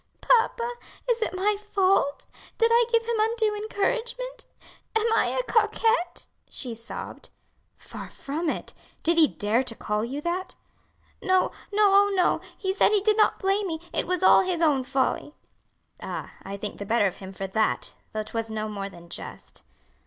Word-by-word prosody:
"Papa, 470 0 +2 0.4
is 475 -1 +1
it 370 -5 -1
my 410 +3 +2
fault? 390 -8 +1 0.3
did 460 0 +3
I 475 0 +5
give 460 -1 +3
him 465 -1 -1
undue 440 -1 +1
encouragement? 485 +4 -2 0.5
am 445 +1 +2
I - - +3
a - - -1
coquette?" 445 -5 +1 0.2
she 245 -3 -3
sobbed. 230 +2 -7 0.5
"Far - - -9
from 310 +4 -3
it! - - -4 0.3
did 335 +1 +3
he 315 - +7
dare 215 +1 +1
to 245 -3 -5
call 210 0 -2
you 260 +5 -4
that?" 350 +3 -3 0.7
"No, 375 -1 +3 0.2
no, 410 -1 +4
oh, 405 +1 +6
no; 365 - +2 0.2
he 380 -2 -1
said - - +4
he 420 -2 +3
did 425 +1 +3
not 430 - +3
blame 390 +1 +1
me; 320 -2 -3
it - - 0
was 365 0 0
all - - +7
his 365 -2 -1
own 295 -6 +3
folly." 275 +2 -1 0.7
"Ah! - - -6
I 195 +1 -6
think 205 +1 -6
the 200 - -5
better 230 -1 +3
of 190 - -1
him 190 -1 -9
for 195 0 -5
that; 215 +3 0 0.2
though 215 0 -2
'twas 225 +1 -4
no 215 0 -3
more 200 -2 -5
than 170 -3 -14
just." - - -8
370 Hz, 175 wpm, -26 LUFS, -, 0.7 s, he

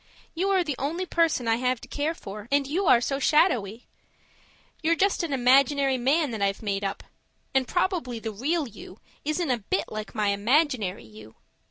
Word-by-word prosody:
You 370 +4 -1
are 380 -2 +3
the 300 -4 -2
only 330 +7 -2
person 330 -9 +1
I 225 0 +3
have 250 0 0
to - - -11
care 300 +3 -2
for, 205 -2 -9
and 285 0 +3
you 340 +7 -1
are 235 - +6
so 275 +2 -1
shadowy. 245 - +2 1.0
You're 330 +1 +2
just 390 +4 +1
an 335 -3 -3
imaginary 270 +1 +3
man 285 +3 +2
that 220 -3 -5
I've 195 +2 0
made 200 -1 -2
up 195 0 -3 0.5
and 265 -1 +2
probably 355 - -1
the 225 0 -5
real 285 +8 -1
YOU 200 -3 -12 0.3
isn't 310 0 -1
a 245 - 0
bit 200 -1 -2
like 215 +1 -6
my 210 -2 +1
imaginary 215 - +1
YOU. 110 0 -14
260 Hz, 185 wpm, -26 LUFS, 215-315 Hz, 1.0 s, are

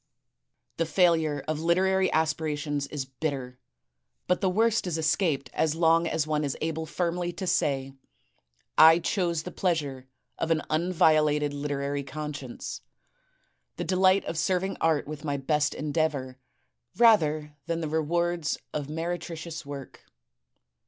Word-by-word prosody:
The 165 - 0
failure 160 -4 +2
of 155 -1 -1
literary 190 +3 +2
aspirations 150 -2 -1
is 145 -3 -4
bitter, 130 -2 -4 0.7
but 180 - +1
the 190 - +2
worst 220 +1 +2
is 165 -2 -1
escaped 155 -4 0
as 160 -1 +1
long 165 0 +3
as 160 -2 0
one 155 -1 0
is 140 -2 -2
able 160 0 -3
firmly 175 +1 -1
to 190 - -5
say: 135 -6 0 0.9
*I 160 +1 +9
chose 170 -2 -1
the 180 - -6
pleasure 145 -9 -2 0.3
of 165 - -1
an 160 -2 +1
unviolated 155 -3 +3
literary 140 0 -2
conscience, 140 - -6 0.9
the - - -3
delight 185 +2 +3
of 165 - -3
serving 185 +3 0
art 160 -3 +2
with 150 0 -7
my 145 -2 -1
best 145 +1 0
endeavor, 145 -4 -2 0.6
rather 155 -10 +4
than 170 0 -1
the 160 - -2
rewards 165 +1 0 0.2
of 145 -2 -3
meretricious 165 0 -5
work. 140 -2 -9
155 Hz, 130 wpm, -27 LUFS, 145-170 Hz, 0.9 s, I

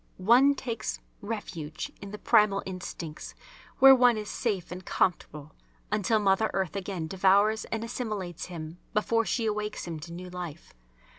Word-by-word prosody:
One 245 +9 +5
takes 235 -4 -4 0.2
refuge 190 -8 -5
in 200 - -7
the 210 - -7
primal 210 -2 +3
instincts 175 -4 -7 0.4
where 270 0 +9
one 245 -3 +5
is 210 -1 -5
safe 200 -9 -2
and 180 +1 -7
comfortable, 150 -5 -1 0.4
until 210 +1 +2
Mother 205 +1 +2
Earth 190 -1 -1
again 190 -4 -3
devours 195 +5 +3
and 225 0 -3
assimilates 210 -7 -4
him 165 -1 -8 0.2
before 230 +2 +2
she 230 0 -1
awakes 210 0 -2
him 165 -3 -5
to 170 +3 -9
new 180 +1 -8
life. 175 -3 -8
195 Hz, 150 wpm, -28 LUFS, 175-220 Hz, 0.4 s, where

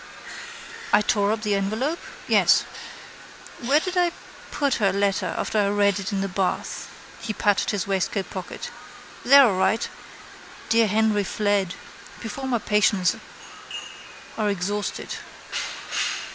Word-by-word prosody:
I - - +6
tore 205 -1 +2
up 220 0 -2
the 210 -1 +1
envelope? 220 - -1 0.3
Yes. - - +5 1.0
Where 270 +5 +3
did 370 +3 -4
I 355 -1 +3 0.4
put 285 -3 0
her 195 -2 +4
letter 200 0 0
after 215 - 0
I 200 - +3
read 205 -1 +2
it 195 - -4
in 195 -1 -1
the 195 - 0
bath? 190 0 -2 0.3
He 225 -2 -3
patted 205 -1 +2
his 205 -3 -1
waistcoatpocket. 190 -1 -3 0.5
There 275 +2 +8
all 220 - +3
right. 190 +4 +1 0.8
Dear 230 -1 +4
Henry 210 0 +2
fled. 200 -2 0 0.4
Before 265 +4 -5
my 250 -2 +2
patience 210 -3 +2 1.2
are 210 -1 +2
exhausted. 200 +2 -2
205 Hz, 125 wpm, -24 LUFS, 195-225 Hz, 1.2 s, There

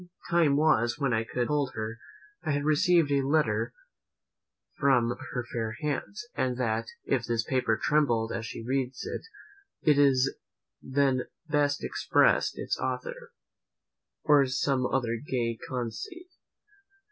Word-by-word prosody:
Time 165 -5 +4
was, 120 -6 +3
when 135 -3 0
I 110 0 +1
could 115 - -11
have 120 - +1
told 145 -3 0
her, 110 +1 -4 0.4
"I 155 - 0
had 145 0 0
received 155 0 +3
a 140 -1 +3
letter 125 -6 +1 1.1
from 120 -4 +3 0.2
her 125 -1 -3
fair 110 -2 -2
hands; 170 - -3
and 125 -1 -1
that, 115 -2 -1 0.2
if 130 -3 +1
this 115 -1 0
paper 125 -4 0
trembled 120 -7 +2
as 115 -1 -3
she 115 - -7
read 130 0 -1
it, - - -4 0.6
it 145 -2 +5 0.7
then 135 -1 +1 0.2
best 145 -1 +1
expressed - - +2
its - - -2
author," - - -4 0.9
or 145 -3 +5
some 130 0 +1
other 120 -3 0
gay 120 -5 -2
conceit. 125 - -5
130 Hz, 135 wpm, -28 LUFS, 115-145 Hz, 1.1 s, it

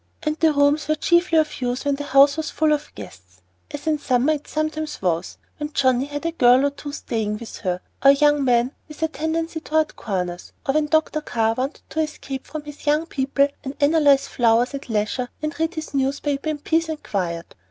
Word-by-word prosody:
And 305 0 0
the 320 -1 +4
rooms 290 +1 +2
were 310 - +2
chiefly 345 +1 +3
of 310 -3 +1
use 245 +2 -2
when 285 - +2
the 290 +1 -4
house 280 +1 +5
was 315 0 -3
full 310 -1 +2
of 295 - -3
guests, 90 -2 -12 0.3
as 290 +1 -7
in 310 -1 +2
the 290 - -21
summer 255 +4 +2
it 295 -1 -6
sometimes 310 0 -3
was, 175 -2 -1 0.2
when 295 0 -4
Johnnie 260 -1 +2
had 290 +2 -6
a 335 - +1
girl 255 -3 +5
or 285 - +1
two 285 +1 -8
staying 215 -6 -3
with 230 +1 -9
her, 180 -2 -2 0.2
or 275 - +8
a 280 - +7
young 295 0 +3
man 245 0 +2 0.2
with 305 0 -7
a - - +3
tendency 320 +1 -3
toward 315 -1 0
corners, 180 -4 -4
or 270 - +1
when 305 0 +2
Dr. 310 0 +1
Carr 225 -5 0
wanted 260 +5 -4
to 315 - -3
escape 280 -3 -5
from 305 0 -6
his 295 0 -11
young 300 +2 +3
people 275 -2 +1 0.2
and 270 +1 -5
analyze 285 -2 +4
flowers 240 +2 +2
at 275 -2 -7
leisure 220 +3 -1
or 305 - 0
read 325 +2 0
his 315 -1 -6
newspaper 280 +2 -1
in 305 - -1
peace 325 +2 0
and 310 -1 -5
quiet. 170 -4 -3
285 Hz, 215 wpm, -22 LUFS, 245-310 Hz, 0.3 s, or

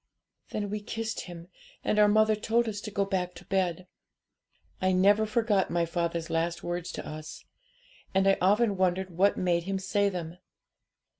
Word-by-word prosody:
'Then 205 -1 -3
we 210 - -2
kissed 225 +1 -4
him, 175 -1 -10 0.4
and 210 - +1
our 210 - +7
mother 215 +1 +4
told 225 +2 +1
us 205 -2 -4
to 215 - -6
go 200 -1 0
back 180 -2 -2
to - - -12
bed. 185 -2 -1 1.0
I 185 0 +2
never 205 +4 +4
forgot 215 -3 +1
my 170 0 +1
father's 170 0 -2
last 165 +1 -1
words 175 0 -3
to - - -6
us; 155 0 -8 0.7
and 190 0 +2
I 195 - +5
often 205 +2 +3
wondered 185 0 +1
what 190 +4 +2
made 170 -2 +1
him 195 0 -1
say 200 +1 +1
them. 175 -2 -6
190 Hz, 170 wpm, -28 LUFS, 175-205 Hz, 1.0 s, our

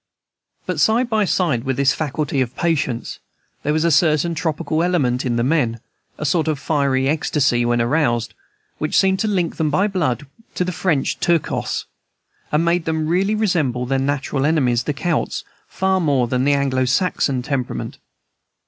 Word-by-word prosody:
But - - -3
side 235 +2 +2
by 215 -2 +2
side 160 -11 0
with 135 -1 -2
this 140 -1 +3
faculty 150 -1 -2
of 125 -1 -3
patience, 145 -8 -1 0.4
there 150 - -1
was 155 +1 +1
a 170 - +3
certain 160 +1 +3
tropical 160 0 -1
element 135 -8 +1
in 120 - 0
the 120 - +1
men, 125 -5 +1 0.4
a 150 - -4
sort 160 +1 +1
of 155 -2 0
fiery 135 -2 0
ecstasy 140 -5 +1
when 120 0 +1
aroused, 120 -3 +1 0.5
which 155 - 0
seemed 190 -1 +3
to 220 - 0
link 180 -5 -1
them 160 -2 +1
by 185 +7 +2
blood 155 - -1 0.3
with 180 - +1
the 180 - -2
French 160 -5 0
Turcos, 170 -3 0 0.7
and 155 +3 +2
made 170 0 +1
them 160 -1 -1
really 190 +6 +1
resemble 155 - 0
their 135 +1 0
natural 135 0 -1
enemies, 130 -6 +2
the 150 - -1
Celts, 170 +1 -1 0.2
far 190 0 0
more 140 -7 +1
than 125 +2 0
the 145 - +4
Anglo 135 -2 +1
Saxon 135 -3 0
temperament. 135 -2 -3
150 Hz, 170 wpm, -20 LUFS, 130-170 Hz, 0.7 s, the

